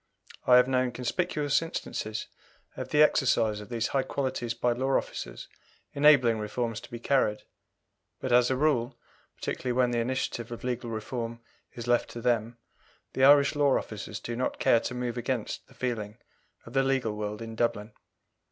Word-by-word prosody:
I 125 Hz, -, +8 dB
have 125 Hz, 0 st, +5 dB
known 130 Hz, -1 st, +1 dB
conspicuous 145 Hz, +3 st, 0 dB
instances 110 Hz, -8 st, -4 dB, 0.5 s
of -, -, -6 dB
the 150 Hz, 0 st, +5 dB
exercise 115 Hz, -8 st, +2 dB
of 105 Hz, -, -11 dB
these 115 Hz, -2 st, -1 dB
high 135 Hz, -, +1 dB
qualities 130 Hz, -3 st, -2 dB
by 120 Hz, +1 st, +1 dB
law 130 Hz, +3 st, +1 dB
officers -, -, -6 dB, 0.5 s
enabling 140 Hz, -6 st, +5 dB
reforms 115 Hz, +1 st, -3 dB
to -, -, -12 dB
be 120 Hz, -, -6 dB
carried, 115 Hz, -4 st, +1 dB, 0.8 s
but 130 Hz, -, -3 dB
as 125 Hz, 0 st, +5 dB
a 130 Hz, -, +1 dB
rule, 130 Hz, -4 st, +1 dB, 0.4 s
particularly 125 Hz, -1 st, -3 dB
when 125 Hz, 0 st, +2 dB
the 120 Hz, -, 0 dB
initiative 120 Hz, -1 st, -2 dB
of 120 Hz, -, -7 dB
legal 125 Hz, -1 st, -3 dB
reform 115 Hz, +1 st, -4 dB, 0.4 s
is 120 Hz, -, -6 dB
left 120 Hz, -1 st, +2 dB
to 120 Hz, -, -7 dB
them, 120 Hz, -1 st, 0 dB, 0.6 s
the 130 Hz, -, 0 dB
Irish 140 Hz, 0 st, +7 dB
law 145 Hz, -2 st, +3 dB
officers 105 Hz, -1 st, -6 dB
do 120 Hz, -, -5 dB
not 130 Hz, +2 st, -2 dB
care 115 Hz, -, +4 dB
to 125 Hz, -, -5 dB
move 125 Hz, -1 st, -3 dB
against 120 Hz, -2 st, -3 dB
the -, -, -20 dB
feeling 110 Hz, -4 st, -3 dB, 0.5 s
of 120 Hz, -, -11 dB
the 135 Hz, -, +3 dB
legal 130 Hz, -5 st, 0 dB
world 105 Hz, 0 st, -4 dB
in 115 Hz, -1 st, -7 dB
Dublin. 115 Hz, -2 st, -1 dB
120 Hz, 170 wpm, -28 LUFS, 115-130 Hz, 0.8 s, I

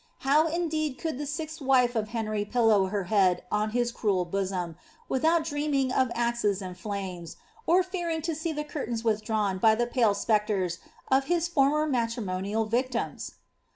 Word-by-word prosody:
ow 300 Hz, +4 st, +4 dB
indeed 315 Hz, -4 st, -1 dB
could 320 Hz, -5 st, -3 dB
the 295 Hz, -, -3 dB
sixth 315 Hz, +1 st, -5 dB
wife 255 Hz, -3 st, +3 dB
of 215 Hz, -1 st, 0 dB
Henry 215 Hz, -2 st, -2 dB
pillow 215 Hz, -3 st, +3 dB
her 200 Hz, 0 st, -2 dB
head 185 Hz, -2 st, +2 dB
on 210 Hz, +1 st, +1 dB
his 240 Hz, +1 st, 0 dB
cruel 200 Hz, -6 st, 0 dB
worn, 185 Hz, -2 st, -2 dB, 0.3 s
without 320 Hz, +5 st, +2 dB
dreaming 290 Hz, -4 st, 0 dB
of 260 Hz, -1 st, +2 dB
axes 235 Hz, -4 st, 0 dB
and 185 Hz, -2 st, -6 dB
flames, 185 Hz, -4 st, -6 dB, 0.3 s
or 360 Hz, +3 st, +5 dB
fearing 345 Hz, -4 st, -3 dB
to 330 Hz, 0 st, -1 dB
see 315 Hz, +2 st, -3 dB
the 300 Hz, -1 st, -3 dB
cur 295 Hz, -1 st, -4 dB
ins 230 Hz, -1 st, -3 dB
withdrawn 215 Hz, -3 st, 0 dB
by 220 Hz, +2 st, +5 dB
the 240 Hz, +2 st, +1 dB
pale 235 Hz, -4 st, +2 dB
spectres 205 Hz, -5 st, 0 dB, 0.3 s
of 270 Hz, +1 st, +4 dB
his 345 Hz, +1 st, +1 dB
former 300 Hz, -2 st, +2 dB
matrimonial 225 Hz, -5 st, -1 dB
victims? 245 Hz, +2 st, -2 dB
235 Hz, 165 wpm, -28 LUFS, 205-295 Hz, 0.3 s, or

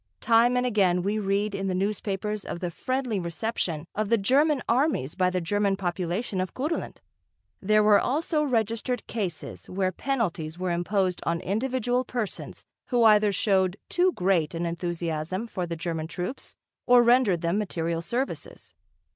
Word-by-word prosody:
Time 240 Hz, +1 st, +4 dB
and 250 Hz, -, +1 dB
again 190 Hz, -7 st, +2 dB
we 205 Hz, +3 st, 0 dB
read 200 Hz, +1 st, 0 dB
in 195 Hz, 0 st, -2 dB
the 185 Hz, -, -1 dB
newspapers 205 Hz, +1 st, -2 dB
of -, -, -5 dB
the 175 Hz, -1 st, -3 dB
friendly 255 Hz, +2 st, -2 dB
reception 170 Hz, -2 st, -2 dB
of 215 Hz, -1 st, -2 dB
the 230 Hz, -, +4 dB
German 275 Hz, +6 st, +2 dB
armies 245 Hz, -, +1 dB
by 185 Hz, -1 st, +2 dB
the 185 Hz, 0 st, -1 dB
German 200 Hz, +3 st, +1 dB
population 185 Hz, +2 st, -2 dB
of 185 Hz, -, -5 dB
Kurland. 300 Hz, +6 st, -3 dB, 0.6 s
There 215 Hz, +2 st, +4 dB
were 210 Hz, -1 st, +6 dB
also 305 Hz, +3 st, 0 dB
registered 230 Hz, -2 st, -1 dB
cases 190 Hz, -8 st, -5 dB
where 185 Hz, 0 st, 0 dB
penalties 175 Hz, -, -2 dB
were 180 Hz, 0 st, -2 dB
imposed 180 Hz, +1 st, 0 dB
on 170 Hz, 0 st, 0 dB
individual 250 Hz, +4 st, 0 dB
persons 240 Hz, -5 st, -5 dB, 0.2 s
who 245 Hz, -2 st, +2 dB
either 210 Hz, -1 st, +6 dB
showed 190 Hz, -1 st, +1 dB
too 365 Hz, +1 st, +3 dB
great 180 Hz, -4 st, +1 dB
an 170 Hz, +1 st, -2 dB
enthusiasm 170 Hz, +2 st, -3 dB
for 185 Hz, -6 st, -4 dB
the 170 Hz, -, -3 dB
German 165 Hz, -1 st, -3 dB
troops 180 Hz, +9 st, -6 dB, 0.3 s
or 245 Hz, 0 st, +7 dB
rendered 235 Hz, -8 st, +4 dB
them 170 Hz, +4 st, 0 dB
material 170 Hz, -5 st, -2 dB
services. 245 Hz, +10 st, -4 dB
200 Hz, 155 wpm, -26 LUFS, 175-235 Hz, 0.6 s, or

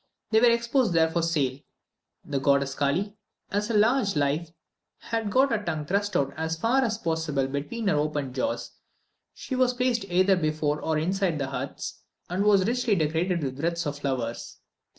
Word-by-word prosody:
They 220 Hz, -, +5 dB
were 240 Hz, +1 st, +6 dB
exposed 235 Hz, -2 st, +2 dB
there 160 Hz, -1 st, +3 dB
for 170 Hz, +1 st, 0 dB
sale. 145 Hz, -6 st, 0 dB, 0.7 s
The 140 Hz, -2 st, -2 dB
goddess 140 Hz, 0 st, +2 dB
Kally, 180 Hz, +10 st, -1 dB, 0.3 s
as 205 Hz, +2 st, -1 dB
large 230 Hz, +5 st, +4 dB
as 200 Hz, -5 st, -2 dB
life, 150 Hz, +3 st, 0 dB, 0.5 s
had 225 Hz, -2 st, -3 dB
got 265 Hz, +6 st, +3 dB
her 215 Hz, -2 st, 0 dB
tongue 155 Hz, -5 st, -3 dB
thrust 200 Hz, +5 st, 0 dB
out 140 Hz, 0 st, 0 dB
as 160 Hz, +1 st, -2 dB
far 235 Hz, +9 st, +2 dB
as 220 Hz, -4 st, 0 dB
possible 160 Hz, -7 st, -1 dB
between 145 Hz, -, -4 dB
her 175 Hz, -, +3 dB
open 145 Hz, -3 st, -1 dB
jaws; 285 Hz, -, -2 dB, 0.6 s
she 260 Hz, -, -5 dB
was 255 Hz, -1 st, +2 dB
placed 245 Hz, -4 st, 0 dB
either 185 Hz, +1 st, +3 dB
before 155 Hz, -3 st, -1 dB
or 160 Hz, -1 st, 0 dB
inside 180 Hz, +1 st, 0 dB
the 135 Hz, -2 st, -2 dB
huts, -, -, -5 dB, 0.3 s
and 185 Hz, +3 st, 0 dB
was 200 Hz, -3 st, +4 dB
richly 240 Hz, -1 st, +1 dB
decorated 165 Hz, +1 st, 0 dB
with 135 Hz, 0 st, -4 dB
wreaths 170 Hz, +2 st, -1 dB
of 145 Hz, -1 st, -3 dB
flowers. 130 Hz, -5 st, -3 dB
170 Hz, 175 wpm, -26 LUFS, 145-215 Hz, 0.7 s, were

